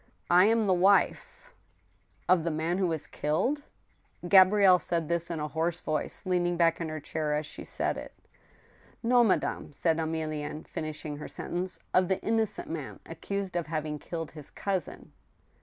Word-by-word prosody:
" - - -38
I - - +6
am 225 0 +3
the 190 - +3
wife— 200 - +2 0.2
" - - -39
" - - -38
Of 180 -3 +4
the 170 - 0
man 165 +3 -1
who 190 - +2
was 160 -3 -2
killed? 160 - -1 0.3
" - - -13
Gabrielle 190 0 +7
said 165 -3 -1
this 170 +1 0
in 165 -2 -3
a 150 - -2
hoarse 160 +3 -1
voice, 155 +4 -3
leaning 175 -1 +1
back 165 0 +3
in 165 - -2
her 155 0 -4
chdr 150 0 -2
as 150 - -3
she - - -9
said - - -2
it. - - -9
f* - - -35 0.8
No, 240 +1 +5
madame," 205 -7 0
said 160 +2 +1
Emilienne, 155 -1 -3
finishing 155 -2 -5
her 150 - -7
sentence; 180 +2 -3
" - - -40
of 185 0 +4
the 190 0 0
innocent 220 -1 0
man 155 -4 -6
accused 190 +3 -5
of 170 -3 -1
having 155 -1 -3
killed 165 -1 -5
his 150 -3 -9
cousin." 190 -5 -4
170 Hz, 190 wpm, -29 LUFS, 155-185 Hz, 0.8 s, Gabrielle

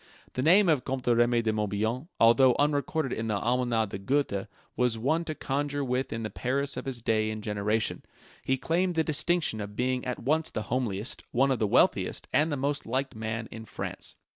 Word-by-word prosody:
The 130 - -2
name 180 +7 +5
of 150 -7 +3
Comte 130 -1 -3
Remy 120 0 +3
de 110 -1 +1
Morbihan, 110 +6 -1
although 120 +2 +6
unrecorded 145 0 0
in 110 - -3
the 105 -2 0
Almanach 120 -1 +1
de 100 - -5
Gotha, 105 -3 0 0.3
was 125 -2 +1
one 155 +9 +1
to 155 - -3
conjure 145 +1 -2
with 130 0 -1
in 115 0 -3
the 105 - -4
Paris 140 +5 -1
of - - -5
his 125 -4 -4
day 110 -1 +1
and 110 -1 -5
generation. 105 +1 0 0.4
He 130 - +1
claimed 175 +5 0
the 160 - +3
distinction 160 -6 0
of 105 0 -7
being 125 +1 0
at 125 -1 -3
once 155 +5 0
the 110 - -4
homeliest, 115 -4 -2
one 135 +3 +2
of 130 - 0
the 110 - +2
wealthiest, - - +2
and 150 +4 +3
the 145 - -1
most 140 0 -1
liked 130 +3 -1
man 110 +1 -4
in 110 - -8
France. - - -6
125 Hz, 200 wpm, -28 LUFS, 110-145 Hz, 0.4 s, although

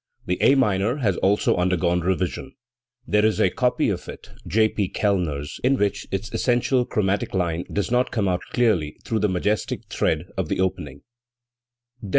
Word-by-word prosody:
The 90 +1 -2
A 135 +6 +5
minor 105 -3 +2
has 105 -10 +1
also 100 +2 +2
undergone 90 -1 +1
revision. 95 +8 -2 0.5
There 105 -4 +2
is 110 0 +2
a 90 - +3
copy 125 +4 +1
of - - -4
it - - -10 0.2
J, 110 +1 +3
P. 100 -3 -2
KeUner's 85 -9 -1
in 135 +2 +3
which 105 -3 -1
its 95 +3 -4
essential 125 0 +1
chrom 100 -5 0
atic 100 - -6
line 85 -2 -1
does 100 +1 -2
not 125 +1 +2
come 105 -4 -1
out 90 -1 0
clearly 100 -12 +1
through 110 - -1
the 105 0 +1
majestic 95 +3 -1
tread 80 +1 0
of 90 -5 -2
the - - -1
opening, 90 -7 -2 1.0
B. 105 - -7
G. - - -8
100 Hz, 180 wpm, -23 LUFS, 90-110 Hz, 1.0 s, A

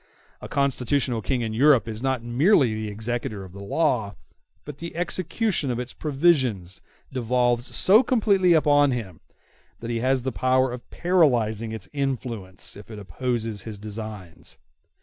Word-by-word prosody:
A - - -7
constitutional 130 -3 0
King 120 +6 -1
in 110 -2 -3
Europe 135 0 +4
is 110 0 -5
not 130 -3 -1
merely 130 - +3
the 110 0 -4
executor 110 -1 -4
of 95 -2 -12
the 100 - -9
law, 110 - 0 0.5
but 145 -1 -9
the 170 -1 -7
execution 180 - -1
of 120 - -1
its 125 0 -5
provisions 135 - 0 0.3
devolves 120 0 0
so 210 +5 +6
completely 205 -8 +3
upon 145 -2 +4
him 110 -10 -4 0.6
that 115 0 -5
he 115 - -1
has 130 +1 +1
the 130 - -1
power 130 +1 +2
of 125 - -10
paralyzing 120 - +1
its 110 - -5
influence 120 - -4
if 105 +2 -12
it 110 - -8
opposes 110 +3 -3
his 110 +1 -7
designs. 105 -4 -8
125 Hz, 150 wpm, -24 LUFS, 110-145 Hz, 0.6 s, so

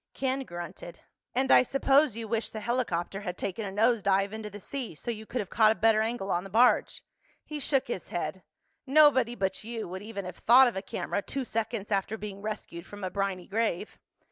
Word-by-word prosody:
Ken 265 0 -1
grunted. 175 -1 -8 0.3
"And 265 +1 +2
I - - +8
suppose 275 0 +3
you 230 -1 -5
wish 225 +1 -1
the 220 - -6
helicopter 205 -5 -2
had 180 -3 -5
taken 200 +2 -3
a - - -5
nose 225 +3 +3
dive 195 +1 +1
into 220 -1 -5
the 205 0 -9
sea, 245 - -5
so 235 - -4
you 220 -1 -8
could 245 - -2
have 195 - -9
caught 215 -1 +5
a - - 0
better 220 0 +3
angle 220 -3 -2
on 175 +1 0
the 195 - -9
barge." 235 +5 +3 0.4
He 300 -1 -6
shook 270 -1 +1
his 215 -6 -4
head. 175 +1 -4 0.5
"Nobody 270 -4 +5
but 195 -1 -2
you 225 0 -5
would 185 +2 -6
even 205 -2 -6
have 180 -1 -7
thought 255 +3 +7
of 240 - -2
a 190 - -2
camera 200 +1 -3
two 270 +5 -4
seconds 220 -2 -3
after 200 +2 0
being 200 -2 -7
rescued 195 -5 -6
from 205 -1 -10
a 185 - -2
briny 195 -2 -2
grave." 215 -2 -2
215 Hz, 215 wpm, -29 LUFS, 195-240 Hz, 0.5 s, I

